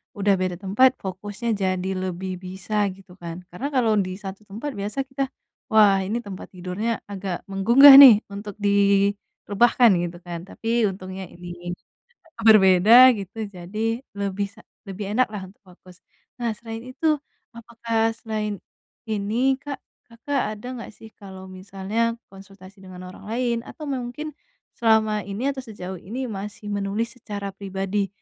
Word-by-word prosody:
udah 200 -1 +2
beda 185 -1 -1
tempat, 255 +7 +4
fokusnya 205 +4 -5
jadi 185 0 -1
lebih 185 +1 -4
bisa, 190 +3 -2
gitu 190 -1 -18
kan. 170 +1 -7
Karena 245 +11 -4
kalau 235 -4 +3
di 185 -1 -2
satu 195 +1 -9
tempat, 225 +9 -5
biasa 210 +7 -2
kita, 270 0 -3 0.4
"Wah, 210 -4 +5
ini 235 +4 -2
tempat 195 -2 -8
tidurnya 190 +6 -3
agak 190 -2 -4
menggugah, 260 +8 +9
nih, 235 -6 +10
untuk 205 0 -7
direbahkan," 200 +3 +2
gitu 175 0 -4
kan. 175 -1 -6
Tapi, 230 +1 0
untungnya 190 0 -6
ini 175 0 -8 0.7
berbeda, 215 +5 +8
gitu, 205 +3 -6
jadi 215 +5 -4
lebih 200 0 -2
sa 220 +2 -18 0.3
lebih 200 +1 -5
enaklah 215 -5 0
untuk 195 - -21
fokus. 180 -1 -18 0.4
Nah, 235 -1 0
selain 225 -1 -7
itu, 310 0 +1 0.4
apakah, 230 -1 -1
selain 215 -3 -4 0.5
ini 220 +5 +1
Kak, 285 -2 -6 0.3
Kakak 230 -2 -3
ada 210 - -11
nggak 235 - -8
sih, 220 - -13
kalau 190 -2 -11
misalnya 195 +5 -3 0.2
konsultasi 195 0 -15
dengan 185 -1 -10
orang 205 - -13
lain, 240 0 0
atau 310 - -9
mungkin, 270 +3 -4 0.4
selama 220 -2 +2
ini 215 +8 -2
atau 270 - -6
sejauh 190 -5 -8
ini, 245 +9 -5
masih 205 +1 -7
menulis 205 +4 -2
secara 200 -2 -5
pribadi, 195 0 -2
205 Hz, 140 wpm, -23 LUFS, 190-230 Hz, 0.7 s, nih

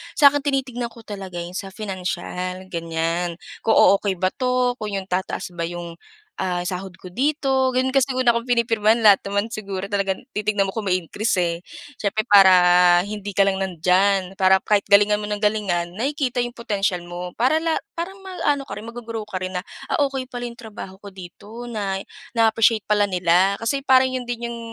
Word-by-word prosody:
Sa 285 -3 +7
akin, 290 - 0
tinitignan 265 -4 -2
ko 230 0 -15
talaga 195 -4 -8
yun 175 0 -5
sa 195 +2 -5
financial, 185 -2 -4
ganyan. 165 +1 -2 0.2
Kung 225 - +2
o-okey 200 -1 +4
ba 185 +1 0
'to, 250 -1 0
kung 210 -2 -4
yung 195 - -2
tataas 185 0 -2
ba 170 -1 -3
yung, 170 0 -7 0.4
ah, 180 -1 -1
sahod 185 +1 -5
ko 180 - -9
dito, 265 - +1
gano'n. 260 +1 +2
Kasi 270 0 +2
ang 255 - +1
una 240 - +4
kong 235 0 -2
pinipirmahan, 230 -2 +2
lahat 205 -3 +7
naman 200 +3 -1
siguro 195 -4 -5
talagang 195 -2 -1 0.2
titignan 210 -1 +1
mo - - -3
kung 215 0 -4
may 180 - +2
increase 210 +7 -2
eh. 170 -1 -2 0.4
Siyempre 210 +1 0
para 195 -2 +8 0.5
hindi 205 0 -6
ka - - +4
lang 195 -1 +1
nandiyan, 190 +1 +1
para 190 0 +5
kahit 210 -1 +2
galingan 205 +1 +5
mo 210 - -4
ng 210 0 -3
galingan 195 -5 0
nakikita 270 +1 -1
yung 240 - -7
potensial 200 -5 -1
mo. 175 +1 -7
Para 260 +6 +2
la 325 0 -1 0.2
parang 385 +3 -5
mag-aano 360 -7 -1
ka - - -5
rin, 220 - -8
mag-go-grow 230 -2 -6
ka 190 -3 -5
rin 185 0 -3
na, 180 - -5 0.2
"Ah, - - 0
okey 265 -2 -5
pala 245 -1 -5
yung 240 - -6
trabaho 200 -3 -10
ko 205 - -9
dito, 200 +5 -11
na 205 -5 -3 0.4
na-appreciate 225 0 +4
pala 205 -1 +2
nila. 180 +2 +3
Kasi 275 +5 -1
parang 265 -1 +5
'yon 255 - -2
din 240 0 -3
yung 235 0 -5
205 Hz, 195 wpm, -22 LUFS, 185-240 Hz, 0.5 s, para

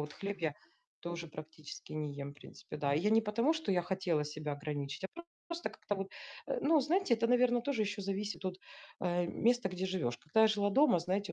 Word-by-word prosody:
Вот 150 0 -4
хлеб 200 0 -4
я 160 -3 0 0.5
тоже 170 0 -4
практически 155 0 -9
не 150 -2 -3
ем, 140 - -5
в - - -19
принципе, 145 +1 -10
да. 140 -1 +2
И 150 - +3
я 210 - +2
не 220 +1 +6
потому, 230 +8 +2
что 320 -10 -1
я 180 -1 +2
хотела 180 -4 0
себя 150 0 -4
ограничить, 145 +3 -4
а - - -1
просто, 340 0 -10 0.2
просто 340 0 -3
как-то 205 - -3
вот, 195 0 -2 0.4
э, - - 0
ну 310 -1 +5
знаете, 335 -1 +3
это, 230 0 +1
наверно, 245 0 +4
тоже 255 -4 +1
еще 205 0 -2
зависит 195 -1 -3
от, 185 -1 -2 0.4
э, 175 -1 +1 0.2
места, 240 -3 +4
где 185 0 -2
живешь. 160 -11 -1
Когда 155 +10 +2
я - - +9
жила 205 -1 +2
дома, 275 -4 +5
знаете, 190 +4 -1
190 Hz, 225 wpm, -34 LUFS, 155-230 Hz, 0.5 s, я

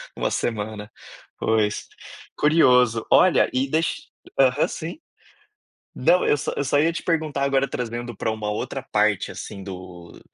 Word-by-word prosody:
uma - - -1
semana. 105 -2 -3 0.5
Pois, 110 -2 0 0.5
curioso. 125 -7 +4
Olha, 185 -2 +5
e 130 +2 0
deix 160 +3 -1 0.3
aham, 135 +2 +4
sim. 165 - -6 1.0
Não, 180 - +3
eu - - +4
só 145 - -3
só 145 +1 +2
ia 165 +2 +3
te - - -4
perguntar 155 -4 -1
agora 135 0 +2
trazendo 120 -1 -4
para - - -2
uma 110 -1 -4
outra 130 +4 -4
parte, 105 -4 +1
assim, 100 -2 -8
do 90 -2 -10
125 Hz, 140 wpm, -23 LUFS, 105-145 Hz, 1.0 s, Olha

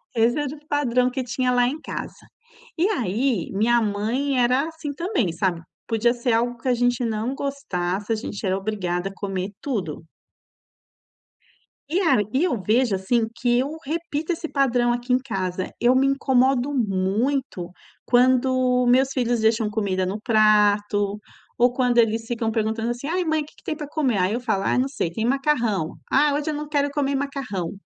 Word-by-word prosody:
esse 230 +4 +3
era 290 0 -3
o 300 0 -19
padrão 250 -3 +1
que 255 0 -3
tinha 250 +1 -1
lá 245 0 +3
em 295 +5 -3
casa. - - -6 0.6
E 345 +4 +3
aí, 235 - -1
minha 235 +4 +3
mãe 230 +6 0
era 255 +5 +2
assim 320 -2 -6
também, 335 - -1
sabe, 175 -1 -1 0.3
podia 230 +1 +2
ser 240 -1 -1
algo 240 +1 0
que 245 - -7
a 250 - +4
gente 245 0 +1
não 225 +3 -2
gostasse, 205 -9 -3
a - - +1
gente 215 -1 -5
era 190 0 +1
obrigada 195 -3 -2
a - - -12
comer 195 -1 -3
tudo. 185 - -3 1.8
E 340 +6 0
a 325 - +4
e 270 +6 +2
eu 275 - 0
vejo, 220 +1 +2
assim, 225 +4 0
que 240 0 +2
eu 285 +5 -2
repito 320 +1 -2
esse 325 0 -5
padrão 245 -3 +2
aqui 245 +1 -1
em 250 - +4
casa, 190 -7 -3
eu 245 +2 +4
me 270 +1 +4
incomodo 265 0 +2
muito 210 -1 -1 0.4
quando 255 0 +3
meus 260 +2 +4
filhos 240 -2 0
deixam 220 0 +2
comida 200 -3 -1
no 195 +4 -3
prato 210 -2 +3 0.4
ou 245 +1 +4
quando 245 -1 +2
eles 225 0 +2
ficam 230 -2 -1
perguntando 220 +1 -1
assim: 245 +4 -5
"Ai, 360 +2 0
mãe 315 -2 0
que - - -18
que - - -22
tem 310 - -3
para 295 -2 -6
comer?" 280 -7 0
Aí 185 +2 +1
eu 235 - -1
falo: 215 -5 0
"Ai, - - +1
não 260 - +1
sei, 175 - -2
tem 220 +6 -2
macarrão". 240 - 0 0.2
"Ah, 290 +1 +4
hoje 295 +2 -1
eu 305 - -2
não 300 +1 -5
quero 285 -1 +1
comer 280 -1 0
macarrão." 270 -11 -3
245 Hz, 185 wpm, -23 LUFS, 210-275 Hz, 1.8 s, a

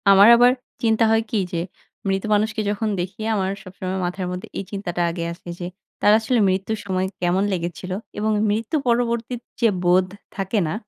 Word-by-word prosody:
আমার 195 +1 +8
আবার 245 +1 +6 0.3
চিন্তা 225 0 +3
হয় 225 0 +4
কি? - - -1 0.2
যে - - 0 0.5
মৃত 195 0 0
মানুষকে 215 +2 +1
যখন 210 +1 -1
দেখি 190 +4 -4
আমার 190 -2 0
সবসময় 185 0 -4
মাথার 180 +1 -3
মধ্যে 180 0 -5
এই - - -3
চিন্তাটা 185 -4 -3
আগে 170 0 -4
আসে 175 - -12
যে, 175 - -4 0.4
তার 205 - +6
আসলে 230 +2 +1
মৃত্যুর 195 +4 -1
সময় 185 -1 0 0.2
কেমন 180 +2 +2
লেগেছিলো? 175 +1 -3 0.2
এবং 215 +1 +1 0.2
মৃত্যু 220 +7 -1
পরবর্তী 235 0 +1 0.3
যে 235 - +6 0.2
বোধ 180 +1 +4 0.3
থাকে 195 +2 0
না, 155 - -2
195 Hz, 175 wpm, -22 LUFS, 185-220 Hz, 0.5 s, আমার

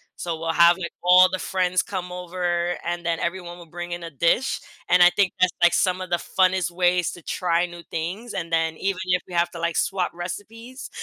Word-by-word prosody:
so 170 -2 -4
we'll 165 0 -2
have, 170 +2 +6
like, 180 -2 -5
all 180 +1 +7
the 185 - -2
friends 185 -1 0
come 180 -3 -5
over 175 -1 -2
and 175 0 -3
then 170 -1 -1
everyone 175 0 -4
will 170 - -12
bring 175 +1 -7
in 175 0 -5
a 165 - -7
dish 170 - +1 0.3
and 180 0 +4
I 175 - +9
think 195 0 +1
that's, 185 - +4
like, 175 - +6
some 185 -1 +1
of 185 -1 -7
the 175 - +3 0.2
funnest 185 -2 +3
ways 180 0 +1
to 175 - -12
try 175 -1 0
new 175 -1 -10
things 185 +9 -4
and 165 -3 -4
then 160 -1 +1
even 195 -1 -2
if 180 -1 +1
we 180 - -11
have 170 0 +2
to, 170 - -8
like, 170 0 -1
swap 190 -2 0
recipes. 225 +8 -8
175 Hz, 225 wpm, -23 LUFS, 170-185 Hz, 0.3 s, I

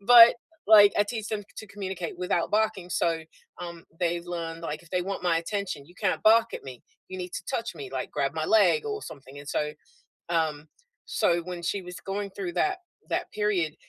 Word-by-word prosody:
but, 235 +2 +9 0.3
like, 205 -2 +9
I 205 - +5
teach 220 0 -4
them 215 -1 -2
to 215 - -7
communicate 190 -4 -5
without 180 -2 0
barking, 210 -4 +1
so, 165 -1 +1 0.4
um, 170 -1 -7 0.2
they've 170 -1 0
learned, 165 -1 -5
like, 155 0 -4
if 170 - -19
they 180 -1 +1
want 195 +1 -4
my 175 -2 +3
attention, 170 -5 -4
you 175 - -18
can't - - -1
bark 225 +1 +6
at - - -7
me, 130 -3 -9 0.3
you 185 - -6
need 180 0 -5
to - - -4
touch - - -2
me, 410 - -7
like, - - -3
grab - - 0
my - - -1
leg 445 +7 +4
or 425 -1 -3
something, 135 +1 -10
and 145 0 -10
so, 150 0 -1 0.6
um 160 -3 0 0.4
so, 175 0 +3
when 175 0 -6
she 195 +3 -1
was 180 0 -8
going 200 +1 -3
through 190 -2 -5
that 380 - +1 0.3
that - - -2
period, 200 -7 0
180 Hz, 205 wpm, -27 LUFS, 165-205 Hz, 0.6 s, but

